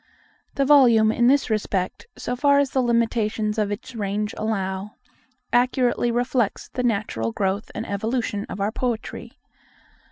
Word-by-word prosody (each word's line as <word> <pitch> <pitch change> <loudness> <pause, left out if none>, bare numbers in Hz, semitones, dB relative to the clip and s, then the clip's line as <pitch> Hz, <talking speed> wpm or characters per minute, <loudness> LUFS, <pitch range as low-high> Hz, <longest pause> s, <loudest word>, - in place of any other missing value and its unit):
The 275 - +2
volume, 240 -6 +6
in 240 +1 +2
this 275 -2 +3
respect, 200 - -2
so 245 - -3
far 280 +2 +3
as 280 -1 +2
the 265 - +1
limitations 225 -2 0
of 210 -1 0
its 255 +5 -6
range 210 -1 -2
allow, 195 -2 -3 0.6
accurately 245 0 +2
reflects 240 -2 -1
the 255 - -3
natural 200 - -1
growth 195 - -2
and 220 - -4
evolution 215 0 -2
of 190 - -6
our 200 +2 0
poetry. 240 -1 -4
225 Hz, 140 wpm, -23 LUFS, 205-245 Hz, 0.6 s, volume